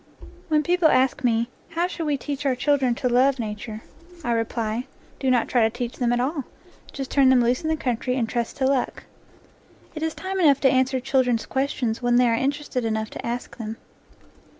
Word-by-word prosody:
When 305 -2 +2
people 350 +1 +3
ask 265 -2 +2
me, 230 -1 +2 0.2
"How 335 +1 0
shall 340 -3 -4
we 290 -1 +1
teach 285 +1 -5
our 270 -3 +1
children 265 -2 +2
to 250 - -1
love 255 +3 +3
1 230 -3 -2
NATURE 210 +1 -6
LORE 215 - -5
nature?" 340 -2 -15
I - - +1
reply: 230 +1 -1 0.3
"Do 265 - 0
not 245 -2 +3
try 245 - +2
to 220 - +4
teach 240 +1 -5
them 240 -2 +1
at 245 - +1
all. 275 +2 -1 0.5
Just 270 -1 -6
turn 275 -2 +5
them 260 -1 +6
loose 245 +2 +1
in 315 - -3
the 315 - +1
country 250 -1 -1
and 230 -3 0
trust 235 0 -3
to 265 - +1
luck." 265 -2 0 0.9
It 310 - -6
is 320 0 -2
time 380 0 -4
enough 285 -6 +5
to 265 - +5
answer 260 0 +2
children's 255 -3 +1
ques 270 +1 -1
tions 230 -2 -2
when 245 0 +2
they 245 0 +5
are 230 - +2
interested 270 0 -1
enough 220 -1 -2
to - - -7
ask 240 +1 -4
them. 225 -1 -5
255 Hz, 220 wpm, -24 LUFS, 235-285 Hz, 0.9 s, them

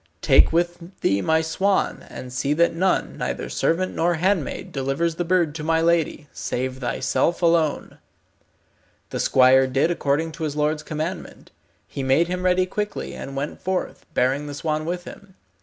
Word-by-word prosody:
Take 135 - +6
with 175 +2 -2
thee 100 0 +2
my 160 +5 +2
swan, 190 +5 0
and 125 -1 -8
see 135 +3 0
that 170 +3 +3
none, 185 +3 0
neither - - -3
servant 185 +3 0
nor 175 +1 +1
handmaid, 180 -2 -1
delivers 135 +5 -1
the 175 - -2
bird 170 -3 +1
to 155 -1 -6
my 160 +1 +2
lady, 165 -3 +1
save 130 +1 -3
thyself 165 +7 0
alone." 165 -3 +1 1.1
The - - -3
squire 130 +1 +5
did 135 +6 +1
according 160 0 0
to 160 +1 -7
his 150 -2 -2
lord's 150 +1 0
commandment. 155 +4 -6 0.4
He - - -5
made 135 +6 +2
him 180 0 -2
ready 185 0 +3
quickly, 210 +3 -4
and 135 - -7
went 140 +2 -4
forth, 185 0 -3
bearing 135 +4 +1
the 145 - -6
swan 155 +1 -2
with 175 +1 -3
him. 195 0 -12
160 Hz, 165 wpm, -23 LUFS, 140-175 Hz, 1.1 s, Take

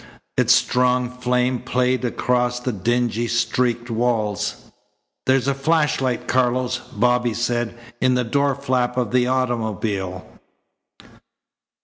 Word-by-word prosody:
Its 125 -1 +3
strong 125 0 +1
flame 125 0 +1
played 125 +1 0
across 125 0 0
the 125 +1 -2
dingy, 120 +2 0
streaked 120 0 0
walls. 110 -4 -1 0.6
"There's 130 0 +3
a 140 - +2
flashlight, 135 -3 0
Carlos," 125 0 +1
Bobby 120 +1 +1
said, 120 0 -1 0.2
"in 130 0 +3
the 125 - +1
door 140 +3 +1
flap 125 -2 -1
of 120 -4 0
the 125 0 +2
automobile." 110 -7 -2
125 Hz, 110 wpm, -21 LUFS, 120-125 Hz, 0.6 s, Its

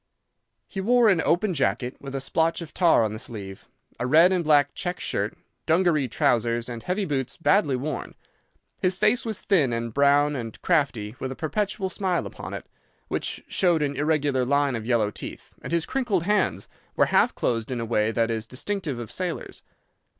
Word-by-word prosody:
He 195 - -5
wore 240 +2 +4
an 180 -5 +3
open 185 +3 +2
jacket, 125 - 0
with 140 -1 -7
a 135 - -2
splotch 165 +4 0
of 170 -3 -8
tar 170 -10 +4
on 110 -1 -1
the 110 - -6
sleeve, 100 -5 -8 0.3
a 125 - -1
red 165 +7 +6
and 180 -2 +1
black 145 -2 +4
check 180 0 -3
shirt, - - -2 0.3
dungaree 160 -4 +3
trousers, 115 0 +1
and 120 -2 -6
heavy 190 - -1
boots 135 -6 -3
badly 165 -5 +3
worn. 140 +2 -4 0.6
His 185 0 +1
face 215 +5 +3
was 220 -3 -3
thin 160 -11 +2
and 115 -1 -3
brown 145 +2 +3
and 115 -4 -6
crafty, 130 - 0
with 130 - -4
a - - -5
perpetual 190 +6 -2
smile 185 -2 -1
upon - - -7
it, - - -7 0.4
which - - -3
showed 170 -5 +2
an 140 -1 -1
irregular 145 -3 +1
line 140 +1 +1
of 115 0 -5
yellow 115 -4 +2
teeth, - - -8
and - - -7
his 170 -1 +1
crinkled 240 -10 0
hands 205 +1 0 0.3
were - - +4
half - - +4
closed 115 -1 -1
in 125 -2 -3
a 115 - -2
way 110 -1 +1
that 115 0 0
is 110 -1 -3
distinctive 155 - -3
of 120 -3 -7
sailors. - - -4
145 Hz, 185 wpm, -25 LUFS, 120-180 Hz, 0.6 s, red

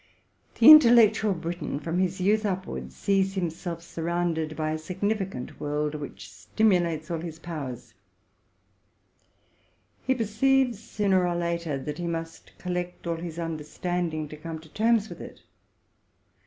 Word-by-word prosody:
The 235 +6 +9
intellectual 230 -8 +7
Briton, 170 -3 -4
from 165 +3 -2
his 185 0 0
youth 210 +4 +2
upwards, 190 -2 -4
sees 195 0 +1
himself 170 -1 -3
surrounded 165 -2 -2
by 155 -1 -1
a 155 - -2
significant 190 - -3
world, 150 +1 -1
which 150 -2 -7
stim 220 -1 +1
ulates 170 -3 0
all 165 - -1
his 165 -2 -7
powers: 135 -8 -7 2.1
he 260 - +3
perceives, 245 +1 +2
sooner 200 -5 +1
or 175 - -1
later, 170 -3 -2
that 150 +3 -6
he 175 - -3
must 165 -1 -6
collect 180 -1 -4
all 170 -1 -1
his 165 -1 -7
understanding 165 0 -3
to 150 - -9
come 160 +1 -6
to 160 - -16
terms 220 +3 +2
with - - -10
it. - - -11
175 Hz, 140 wpm, -27 LUFS, 160-200 Hz, 2.1 s, The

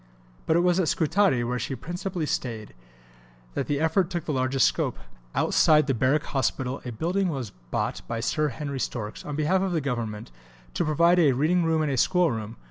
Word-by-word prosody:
But 160 - +3
it 170 - +4
was 180 +1 +3
at 180 - +1
Scutari, 165 -6 +2
where 125 +1 -2
she 135 - -3
principally 175 - -4
stayed, 115 -7 -3 0.8
that - - -2
the 145 -1 0
effort 160 +3 +2
took 175 -3 -4
the 150 - -2
largest 130 -1 +2
scope. - - -1 0.4
Outside 155 -1 +4
the 135 - +1
Barrack 130 +5 +2
Hospital 130 -1 -2
a 125 - -5
building 180 - 0
was 130 - -4 0.2
bought - - -2
by 115 - -3
Sir 150 +6 0
Henry 140 -1 -4
Storks, 110 -4 -4
on 150 - -5
behalf 160 +5 +2
of 190 -2 -1
the 165 - +1
Government, 115 - -4 0.4
to - - 0
provide 170 +4 +4
a 150 -6 +5
reading 160 +7 +2
room 160 -1 +2
and 150 - 0
a 135 - -1
school 180 +5 +3
room. 110 -1 -5
150 Hz, 200 wpm, -26 LUFS, 125-170 Hz, 0.8 s, a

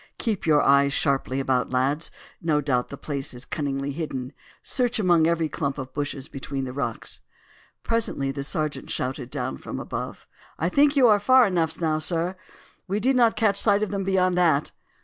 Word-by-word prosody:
"Keep 215 -7 -2
your 150 -2 +5
eyes 140 0 +4
sharply 135 -2 0
about, 130 -2 0
lads. 135 +5 0 0.3
No 155 -3 +2
doubt 130 -4 0
the 140 - -7
place 140 -3 -3
is 125 - -6
cunningly 140 -2 -3
hidden. 135 -4 -5 0.3
Search 250 -1 +1
among 175 -6 +4
every 165 -1 +1
clump 140 -1 -3
of 130 -1 -7
bushes 145 -1 -4
between 135 -1 -5
the 125 -1 -5
rocks." 125 -5 -4 0.6
Presently 215 -12 0
the 140 0 -4
sergeant 150 -1 -3
shouted 130 -1 -3
down - - -3
again - - -19
from - - -6
above: - - -6 0.3
"I 165 - 0
think 285 +7 +4
you 265 -3 +6
are 210 -2 +5
far 255 +4 +6
enough 165 -5 0
now, 155 -2 +1
sir! 170 +3 -1 0.5
We 200 +2 -1
did 260 +5 +2
not 235 -3 +4
catch 200 -3 +3
sight 205 -1 +3
of 215 - -2
them 200 -1 -2
beyond 185 -1 +2
that!" 160 -5 +2
155 Hz, 190 wpm, -25 LUFS, 135-195 Hz, 0.6 s, you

